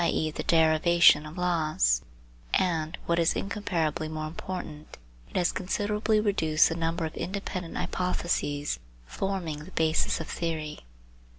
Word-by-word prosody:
e. 155 -2 +1
the - - -4
derivation 160 -1 +5
of 155 +4 -10
laws, 155 - +2 0.5
and 165 -3 0
what 170 0 +1
is 165 0 +3
incomparably 170 -7 -1
more 155 0 -4
important 155 -2 -7 0.3
it - - -19
has 180 -1 +2
considerably 210 +3 0
reduced 160 -7 +3
the 165 - -2
number 165 0 -1
of 155 - -5
independent 185 -2 -4
hypothese 170 -5 -1 0.3
forming 175 - -3
the 185 - -12
basis 160 0 +1
of 165 - -4
theory. 160 -3 -3
165 Hz, 130 wpm, -28 LUFS, 155-180 Hz, 0.5 s, derivation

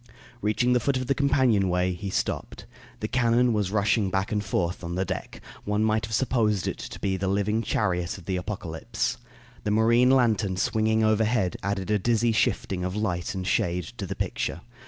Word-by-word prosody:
Reaching 120 +4 +2
the 125 - +4
foot 135 +3 0
of 130 - -2
the 140 - +2
companion 130 -9 +2
way, 90 +1 +1
he 95 +3 -5
stopped. - - -3 0.4
The 110 - -1
cannon 120 0 +2
was 105 -3 0
rushing 105 0 +2
back 95 +1 -1
and 105 -1 0
forth 90 -1 -2
on 85 0 -4
the 95 +1 0
deck. 95 0 -5 0.2
One 105 +1 0
might 110 -1 +1
have 110 - -2
supposed 110 -6 +1
it - - -3
to - - -7
be 95 -1 -1
the 95 +1 -2
living 100 +3 +1
chariot 90 -6 -1
of 90 - -13
the 95 -1 -1
Apocalypse. 110 +6 -3 0.5
The 105 - -1
marine 115 +4 +4
lantern 110 -8 +2
swinging 110 +2 +1
overhead 110 -2 +2
added 100 0 -2
a 105 - +3
dizzy 115 +2 +2
shifting 95 -4 0
of 90 +1 -3
light 90 -5 -2
and 95 -1 -3
shade 90 -1 +1 0.2
to 100 - -3
the - - -4
picture. 85 - -3
105 Hz, 195 wpm, -26 LUFS, 95-115 Hz, 0.5 s, the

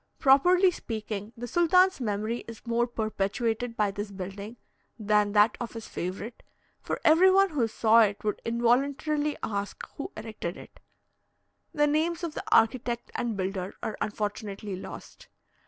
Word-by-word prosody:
Properly 355 +7 +5
speaking, 215 - -5
the 240 - -5
sultan's 365 +3 +3
memory 215 +1 -2
is 230 0 -10
more 235 +1 +1
perpetuated 225 +1 -2
by 210 -2 +2
this 205 +1 -5
building 200 +4 -7 0.4
than 210 -1 +2
that 210 +1 +5
of 240 - -5
his 225 -1 -7
favourite, 190 +6 -5 0.4
for - - -3
every 330 +5 +6
one 390 0 +4
who 260 -7 +1
saw 225 +1 +4
it 205 -1 +1
would 210 -1 -2
involuntarily 275 +6 +1
ask 200 -1 -3
who 280 - -5
erected 215 -5 -5
it. - - -14 0.9
The 295 -1 +2
names 325 +4 0
of 335 -3 -3
the - - -5
architect 235 +1 +2
and 230 -4 -2
builder 190 0 -3
are 215 - -3
unfortunately 205 -1 -4
lost. 185 - -10
230 Hz, 145 wpm, -28 LUFS, 205-275 Hz, 0.9 s, every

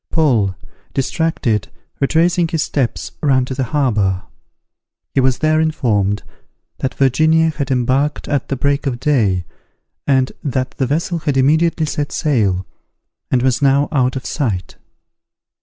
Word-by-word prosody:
Paul, 120 - +2 0.4
distracted, 135 - 0 0.3
retracing 170 +4 +2
his 160 -1 -1
steps, 130 -5 -2
ran 130 -4 +3
to 130 - -5
the 130 0 -1
harbour. 105 -10 0 0.9
He - - +2
was 130 -1 +2
there 155 0 +2
informed, 105 -10 0 0.6
that 130 - -2
Virginia 160 +4 +3
had 140 -3 -4
embarked 135 +3 0
at 145 -2 -1
the 135 - -1
break 140 +2 0
of 120 -3 -2
day, 110 - +1 0.6
and 130 -2 +2
that 130 -2 -1
the 130 - -2
vessel 170 +5 -1
had 145 -3 -1
immediately 160 +4 +3
set 145 -1 -3
sail, 100 -11 +1 0.6
and 125 -1 +1
was 130 -1 +1
now 140 +1 +3
out 130 -2 +1
of 130 - -5
sight. 105 - -2
135 Hz, 140 wpm, -18 LUFS, 125-150 Hz, 0.9 s, ran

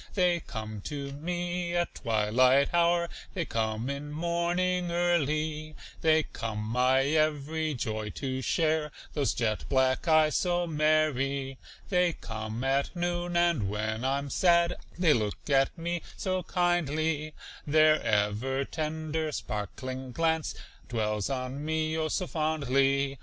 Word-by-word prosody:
They 180 -3 +3
come 110 -7 -6
to 140 -2 -4
me 175 +3 -3
at 175 0 0
twilight 125 +5 +3
hour, 170 0 +3 0.3
They 170 -3 -1
come 110 0 -2
in 140 +1 -4
morning 175 +2 0
early, 155 -3 0 0.3
They 160 -1 +4
come 110 -6 -5
my 125 +5 +2
every 155 +1 0
joy 110 -2 -3
to 130 -2 -3
share, 155 +2 +1 0.2
Those 145 -3 0
jet 110 -3 -1
black 130 +4 +2
eyes 155 -2 +4
so 175 -1 +1
merry. 150 -4 +1 0.3
They 180 -3 +3
come 110 0 -5
at 135 +5 0
noon, 175 0 -1
and 170 - +2
when 110 +2 -2
I'm 140 +1 -1
sad 170 -1 +4 0.2
They 170 -4 +4
look 105 -3 -2
at 135 +4 +3
me 170 +1 -2 0.2
so 185 -1 -1
kindly, 160 -4 0 0.3
Their 155 +1 +5
ever 110 +6 0
tender, 155 +1 -3
sparkling 130 +3 -5
glance 160 +1 0 0.3
Dwells 105 -2 -1
on 130 +1 -3
me, 155 0 -1
oh, 160 -1 0
so 180 +4 -1
fondly. 140 -4 +1
150 Hz, 130 wpm, -29 LUFS, 130-170 Hz, 0.3 s, Their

